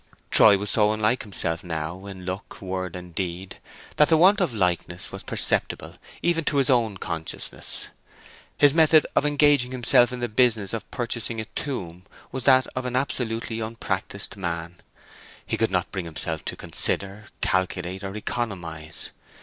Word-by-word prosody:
Troy 105 -2 +8
was 100 +1 0
so 105 -1 +4
unlike 110 +3 +1
himself 85 -5 -2
now 85 +3 -5
in 95 -2 -9
look, 95 +2 -6
word, 95 -2 -4
and 90 -1 -9
deed, 90 +1 -4 0.4
that 150 - +5
the 160 - +5
want 195 +5 +5
of 175 -7 +1
likeness 90 -6 -1
was - - -7
perceptible - - 0 0.3
even 170 -1 +2
to 145 - +1
his 135 -1 +3
own 115 -5 +2
consciousness. 80 -3 -3 0.7
His 145 -1 +5
method 160 -1 +6
of 150 - +3
engaging 145 -3 +4
himself 120 -1 +4
in 125 - -5
this 120 -1 -3
business 110 -4 +2
of 115 - -5
purchasing 115 -1 -2
a 110 - -3
tomb 90 - -4 0.3
was 130 -1 -4
that 130 -2 +6
of 130 0 -3
an 125 0 -3
absolutely 115 -4 -2
unpractised 100 -3 -3
man. 85 -2 -4 0.7
He - - -1
could - - +1
not - - -1
bring 95 -3 -4
himself 80 0 -4
to - - -3
consider, 100 +2 -1 0.2
calculate, 95 0 -1
or 95 +1 -5
economize. 85 -9 -4
105 Hz, 160 wpm, -25 LUFS, 90-125 Hz, 0.7 s, Troy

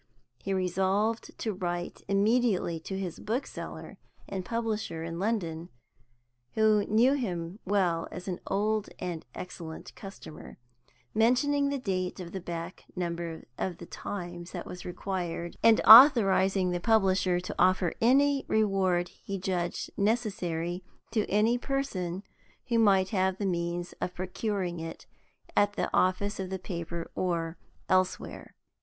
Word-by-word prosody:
He 195 - -4
resolved 190 +4 0
to 220 - -2
write 175 -1 -4
immediately 200 -4 +2
to 190 +4 -5
his 185 -4 -4
bookseller 240 +6 -5 0.3
and 190 -2 -4
publisher 220 -6 -2
in 165 0 -5
London 175 -6 -2 0.9
(who 215 -1 +4
knew 235 +6 +4
him 185 -8 -3
well 180 -4 +1
as 180 - -8
an 180 -2 -3
old 210 +1 0
and 175 -3 -4
excellent 165 -3 -8
customer), 195 -5 -10 0.6
mentioning 280 +6 +3
the 280 - -1
date 185 -7 -2
of 175 -2 -7
the 190 - -4
back 170 0 -6
number 170 -2 -3 0.2
of 180 -3 -2
the 170 - -9
Times 175 -1 -6
that - - -5
was 180 - -8
required, 175 -2 -4
and 225 -1 +6
authorizing 195 -7 +8
the 175 - -1
publisher 190 -3 +3
to 180 - -5
offer 185 -1 +3
any 275 +4 +4
reward 190 -4 +2
he 195 - -6
judged 180 -2 -2
necessary 185 -5 -1 0.3
to 220 -2 0
any 220 +4 +3
person 200 -10 -2 0.5
who 230 -1 +3
might 195 -4 +4
have 190 -3 +1
the 200 - -2
means 175 -1 -2
of 180 - -3
procuring 185 -1 -2
it 165 0 -7 0.5
at 205 0 +3
the - - -2
office 195 +3 +1
of 190 -1 -3
the 190 - -2
paper 170 -2 -5
or 170 -2 -2 0.3
elsewhere. 185 0 -1
190 Hz, 135 wpm, -29 LUFS, 175-215 Hz, 0.9 s, authorizing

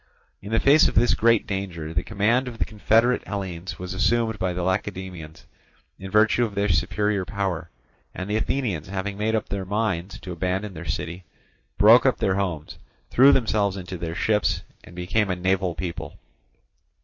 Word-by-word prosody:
In 100 - -8
the 115 - +3
face 145 +3 +6
of - - -3
this 120 +3 +4
great 115 -1 +3
danger, 90 -5 -4
the - - +1
command 110 +5 +1
of 120 -2 -7
the - - 0
confederate 115 +3 +2
Hellenes 95 -3 -5
was 90 +1 -6
assumed 110 +2 +1
by 90 - 0
the 90 0 -3
Lacedaemonians 95 -4 -4 0.5
in 95 - -7
virtue 110 +3 +3
of 105 -4 -3
their 100 +1 0
superior 100 +4 +1
power; 95 -4 -3 0.4
and 95 - -6
the 105 - -1
Athenians, 110 - -1
having 100 +1 -4
made 110 +2 0
up 110 - -2
their 100 -1 -3
minds 100 -1 -2
to 90 - -7
abandon 95 +4 -2
their 85 0 -8
city, 85 +5 -4 0.5
broke - - +7
up - - +2
their 95 - +1
homes, 90 -6 -3 0.3
threw 135 +3 +7
themselves 105 -7 +1
into 90 0 -6
their 80 -1 -4
ships, 105 +2 +1 0.2
and 85 - -14
became 95 +4 0
a 90 - 0
naval 95 -1 0
people. 85 -2 -6
100 Hz, 175 wpm, -24 LUFS, 90-110 Hz, 0.5 s, broke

